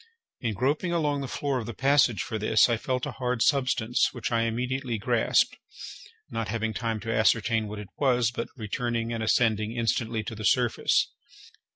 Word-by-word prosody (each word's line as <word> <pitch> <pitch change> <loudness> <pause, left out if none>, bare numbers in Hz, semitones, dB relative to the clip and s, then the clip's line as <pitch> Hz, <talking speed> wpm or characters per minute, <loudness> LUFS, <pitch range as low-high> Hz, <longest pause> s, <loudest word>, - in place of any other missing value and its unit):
In 115 -4 -2
groping 145 - 0
along 150 -4 0
the 135 - -4
floor 135 0 -2
of 115 - -6
the 115 - -6
passage 135 -6 +3
for 110 - -4
this, 110 +1 +4
I 120 - +1
felt 125 +2 -2
a - - -4
hard 125 -2 -1
substance, 125 -4 +2
which 120 -2 -4
I 115 -1 +2
immediately 125 +1 -2
grasped, 115 +2 +2 0.7
not 115 -1 -2
having 110 0 -2
time 115 0 -2
to 115 0 -3
ascertain 110 0 +2
what 105 +1 -7
it 105 -2 -8
was, 125 -4 +2
but 115 - -4
returning 115 0 -2
and 115 - -3
ascending 110 -1 +1
instantly 115 -1 0
to 110 - -6
the 110 0 -7
surface. 120 +2 +2
115 Hz, 180 wpm, -27 LUFS, 110-125 Hz, 0.7 s, this